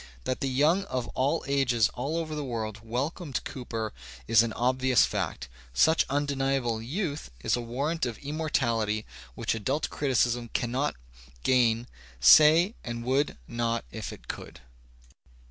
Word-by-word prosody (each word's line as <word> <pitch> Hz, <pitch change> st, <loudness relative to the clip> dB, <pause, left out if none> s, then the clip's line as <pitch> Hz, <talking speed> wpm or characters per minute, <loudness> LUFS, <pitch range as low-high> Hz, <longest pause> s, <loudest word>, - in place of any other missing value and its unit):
That 130 Hz, -, -2 dB
the 135 Hz, -, 0 dB
young 155 Hz, +9 st, +3 dB
of 130 Hz, -8 st, -3 dB
all 140 Hz, +5 st, 0 dB
ages 125 Hz, -6 st, +2 dB
all 140 Hz, +6 st, -3 dB
over 160 Hz, -2 st, -3 dB
the 150 Hz, -1 st, -3 dB
world 110 Hz, -4 st, -4 dB
welcomed 135 Hz, +6 st, -3 dB
Cooper 115 Hz, -4 st, -5 dB, 0.3 s
is 115 Hz, -, +6 dB
an 115 Hz, -1 st, -1 dB
obvious 130 Hz, +1 st, +3 dB
fact. 65 Hz, +2 st, -3 dB, 0.3 s
Such 160 Hz, -, +4 dB
undeniable 135 Hz, -4 st, 0 dB
^' -, -, -8 dB
youth" 155 Hz, -, -3 dB
is -, -, +1 dB
a 120 Hz, -, -3 dB
warrant 135 Hz, +6 st, -2 dB
of 115 Hz, -, -5 dB
immortality 120 Hz, -8 st, -1 dB, 0.3 s
which -, -, -1 dB
adult 130 Hz, +8 st, -1 dB
criticism 120 Hz, -4 st, +1 dB
cannot 125 Hz, +5 st, 0 dB, 0.5 s
gain 120 Hz, -2 st, +3 dB, 0.3 s
say 155 Hz, -, +7 dB
and 120 Hz, 0 st, -5 dB
would 135 Hz, +4 st, +1 dB
not 115 Hz, -, -1 dB
if -, -, -5 dB
it -, -, -12 dB
could. -, -, -8 dB
130 Hz, 145 wpm, -28 LUFS, 115-145 Hz, 0.5 s, say